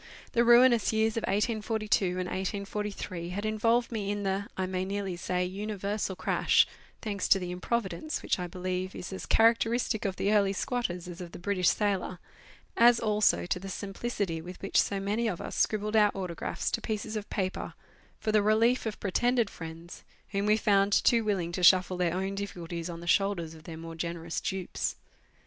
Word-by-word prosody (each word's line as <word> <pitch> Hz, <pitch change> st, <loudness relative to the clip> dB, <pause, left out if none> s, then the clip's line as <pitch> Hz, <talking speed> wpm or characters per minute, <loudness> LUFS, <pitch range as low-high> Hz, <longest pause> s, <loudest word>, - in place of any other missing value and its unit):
The 235 Hz, -2 st, +3 dB
ruinous 240 Hz, -1 st, +6 dB
years 220 Hz, 0 st, +1 dB
of 230 Hz, -, 0 dB
1842 215 Hz, 0 st, 0 dB
and 180 Hz, 0 st, -1 dB
1843 195 Hz, -2 st, -4 dB
had 200 Hz, +4 st, -4 dB
involved 230 Hz, +3 st, +1 dB
me 210 Hz, -3 st, -2 dB
in 205 Hz, 0 st, -2 dB
the, 195 Hz, +1 st, -1 dB
I 190 Hz, -, 0 dB
may 185 Hz, 0 st, -2 dB
nearly 195 Hz, -1 st, -3 dB
say, 180 Hz, 0 st, -1 dB
universal 200 Hz, +1 st, -3 dB
crash, -, -, +3 dB, 0.4 s
thanks 200 Hz, -4 st, -2 dB
to -, -, +6 dB
the 180 Hz, -2 st, -4 dB
improvidence 235 Hz, -, -2 dB
which -, -, 0 dB
I 180 Hz, -, -3 dB
believe 185 Hz, +1 st, -3 dB
is 185 Hz, -, -6 dB
as 190 Hz, -, -6 dB
characteristic 230 Hz, 0 st, +3 dB
of 195 Hz, -2 st, -1 dB
the 200 Hz, +3 st, +1 dB
early 200 Hz, -2 st, +3 dB
squatters 185 Hz, -6 st, -2 dB
as 175 Hz, 0 st, -8 dB
of 175 Hz, -1 st, -8 dB
the -, -, -7 dB
British 185 Hz, -1 st, +1 dB
sailor, 200 Hz, -3 st, 0 dB, 0.6 s
as 235 Hz, 0 st, +6 dB
also 210 Hz, -4 st, +2 dB
to 180 Hz, -, -1 dB
the 195 Hz, +1 st, -7 dB
simplicity 195 Hz, -3 st, -3 dB
with 180 Hz, +2 st, -9 dB
which 195 Hz, -, +3 dB
so 200 Hz, -, -2 dB
many 210 Hz, +4 st, 0 dB
of 185 Hz, -6 st, -2 dB
us -, -, -6 dB
scribbled 215 Hz, 0 st, 0 dB
our 210 Hz, -1 st, +6 dB
autographs 180 Hz, -4 st, -3 dB
to -, -, -1 dB
pieces 215 Hz, 0 st, -3 dB
of 210 Hz, -1 st, -4 dB
paper 190 Hz, -2 st, -3 dB, 0.4 s
for 215 Hz, -, -1 dB
the 215 Hz, -1 st, +4 dB
relief 225 Hz, +4 st, +3 dB
of 215 Hz, -, -5 dB
pretended 235 Hz, +3 st, +1 dB
friends, 165 Hz, +1 st, -9 dB, 0.3 s
whom 200 Hz, +1 st, -1 dB
we 210 Hz, +1 st, +5 dB
found 200 Hz, -2 st, +3 dB
too 230 Hz, +2 st, +4 dB
willing 190 Hz, -5 st, -1 dB
to 180 Hz, -, -3 dB
shuffle 185 Hz, 0 st, +5 dB
their 175 Hz, -1 st, +1 dB
own 190 Hz, +1 st, -2 dB
difficulties 175 Hz, -4 st, -5 dB
on 170 Hz, -1 st, -7 dB
the -, -, -8 dB
shoulders 175 Hz, -3 st, +1 dB
of 160 Hz, 0 st, -14 dB
their 165 Hz, -2 st, -7 dB
more 165 Hz, 0 st, -8 dB
generous 170 Hz, 0 st, -4 dB
dupes. 190 Hz, -2 st, -2 dB
200 Hz, 185 wpm, -29 LUFS, 180-215 Hz, 0.6 s, ruinous